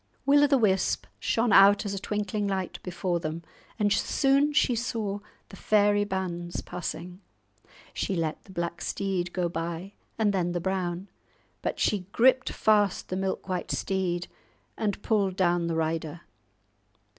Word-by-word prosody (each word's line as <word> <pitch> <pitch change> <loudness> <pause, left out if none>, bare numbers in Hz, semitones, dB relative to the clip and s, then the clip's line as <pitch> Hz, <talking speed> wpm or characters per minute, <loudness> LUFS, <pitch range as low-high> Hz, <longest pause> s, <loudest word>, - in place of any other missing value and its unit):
Will 285 +1 +6
o' - - +6
the 275 -1 +4
Wisp 195 -5 +1
shone 230 -2 +1
out 200 +2 +7
as 200 - -2
a 195 - -3
twinkling 205 0 -2
light 190 -2 -3
before 180 -1 -2
them, 165 +1 -4 0.3
and 205 -2 +2
soon 275 +7 +2
she 275 -3 +3
saw 220 -4 -2 0.3
the - - -11
fairy 205 0 +3
bands 175 -3 -3
passing. 180 +1 -6 0.7
She 195 - -2
let 160 -2 -2
the - - -14
black 170 -1 -3
steed 185 -3 -2
go 180 -1 0
by, 170 +3 -4 0.2
and 215 -2 +2
then 175 -2 0
the 175 - -1
brown. 185 0 -2 0.5
But - - -3
she 195 -4 0
gripped 255 +2 +4
fast 205 -3 +2
the 185 - -2
milk 190 0 -2
white 185 -1 -3
steed, 180 -2 -1 0.5
and 210 -2 -1
pulled 200 -5 +1
down 175 -2 +2
the 165 - -1
rider. 160 0 -2
190 Hz, 155 wpm, -27 LUFS, 175-205 Hz, 0.7 s, out